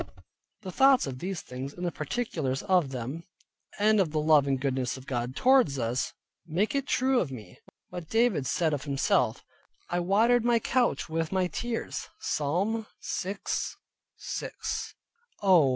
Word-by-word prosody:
The 185 - -5
thoughts 270 +5 +5
of 130 -2 -6
these 185 +2 -3
things 130 +3 -7
in 180 - -7
the 175 - 0
particulars 155 - -2
of 180 -7 +3
them, 130 +5 -5 0.6
and 215 +1 +4
of 185 -5 +3
the 155 - 0
love 150 -2 +4
and 135 -1 +1
goodness 130 -2 -1
of 130 - -11
God 125 -1 -3
towards 255 - +4
us, 120 +1 -1 0.4
make 180 +7 0
it 275 0 -1
true 260 0 +2
of 150 - -1
me, 105 -8 -10 0.3
what 175 -3 -7
David 225 - +2
said 160 -3 +1
of 145 -1 -3
himself, 140 -2 +1 0.5
"I 175 - +1
watered 220 +7 +3
my 240 0 +4
Couch 240 +2 +1
with 160 0 -2
my 190 -1 +2
tears" 230 +7 -3
(Psalm 195 +10 -1
6.6). 195 +2 -5 0.5
Oh! 175 -8 +6
170 Hz, 150 wpm, -28 LUFS, 135-215 Hz, 0.6 s, Oh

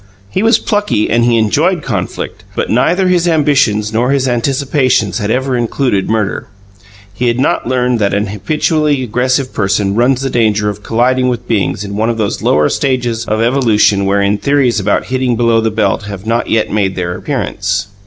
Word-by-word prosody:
He 190 - -1
was 225 +2 +4
plucky 205 - -1
and 120 0 +2
he 120 -1 +3
enjoyed 110 -4 +1
conflict, - - -4
but - - -2
neither 175 - +2
his 175 -1 +2
ambitions 135 -10 +1
nor 120 +3 +1
his 135 -1 +1
anticipations 130 - 0
had 105 - -2
ever 130 +2 0
included 120 -4 -1
murder. 110 -3 -1 0.7
He 125 +5 -2
had 120 +1 0
not 130 - 0
learned 125 -1 0
that 100 -2 +1
an 100 +1 0
habitually 145 - 0
aggressive 130 +3 -1
person 100 -1 0
runs 125 +4 +2
the 135 - -2
danger 105 -3 +1
of 105 0 -6
colliding 125 +4 +1
with 120 -1 -4
beings 105 -2 -1
in 100 0 -6
one 110 +2 0
of 115 - -2
those 105 -2 -2
lower 75 0 +2
stages 120 -4 -1
of 110 +1 -1
evolution 110 -5 +2
wherein 100 +1 +1
theories 140 -5 +1
about 100 +1 0
"hitting 130 -1 -1
below 115 -1 +2
the 110 - 0
belt" 110 -1 -1
have 100 -1 -8
not 115 +1 -1
yet 110 -1 +1
made 100 -3 0
their 90 -1 -3
appearance. 100 -8 -3
115 Hz, 185 wpm, -13 LUFS, 105-130 Hz, 0.7 s, was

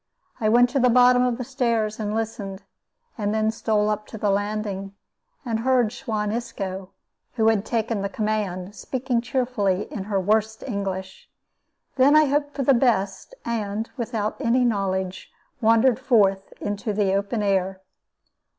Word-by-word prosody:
I 215 - +2
went 245 +2 +5
to 275 - +1
the 250 0 +4
bottom 250 +1 +6
of 250 -2 +1
the 255 - -4
stairs 235 -5 -1
and 210 -1 -2
listened, 205 -3 -4 0.6
and 205 0 0
then 220 0 +2
stole 215 -2 0
up 210 0 -2
to 220 - -8
the 205 -1 +1
landing, 200 -1 -2 0.5
and 225 -2 -1
heard 245 -2 +2
Suan 210 -2 -2
Isco, 195 -5 -4 0.4
who 225 -2 +3
had 215 -3 +1
taken 225 -2 -1
the 200 - -2
command, 205 -3 -2
speaking 250 +1 -2
cheerfully 240 -7 0
in 195 -3 -4
her 200 -2 0
worst 220 +3 0
English. 190 -4 -5 0.7
Then 275 +3 +5
I 310 0 +7
hoped 290 +1 -1
for 275 - -1
the 275 - +5
best, 230 - 0
and, 220 -1 -3
without 225 -4 -3
any 250 0 +2
knowledge, 190 -4 -2 0.3
wandered 230 +2 +4
forth 200 -7 +2
into 205 +2 -3
the 200 -2 +1
open 200 +3 -1
air. 190 -1 0
215 Hz, 155 wpm, -24 LUFS, 200-240 Hz, 0.7 s, I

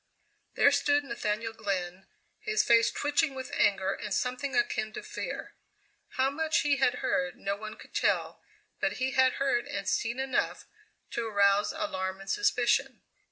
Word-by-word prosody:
There - - +5
stood 290 0 +2
Nathaniel 225 -3 -3
Glenn, 190 -3 -3 0.3
his 430 0 +1
face 230 -1 +5
twitching 290 -1 0
with 260 -1 -6
anger 195 -1 +2
and 210 - -6
something 250 +6 -1
akin 420 - 0
to - - -6
fear. - - -6 0.6
How 265 +1 +3
much 315 +2 +1
he 290 -1 +2
had 250 -2 +1
heard 270 -2 0
no 200 -5 -2
one 215 +1 -8
could - - -15
tell, - - 0 0.4
but - - 0
he 260 +1 -1
had 260 -1 +4
heard 270 -3 0
and 200 -1 -4
seen 230 +3 0
enough 265 -1 -1 0.5
to 235 -1 -2
arouse 200 -1 +3
alarm 285 -13 -3
and 195 - -5
suspicion. 270 -9 +1
250 Hz, 160 wpm, -29 LUFS, 205-275 Hz, 0.6 s, There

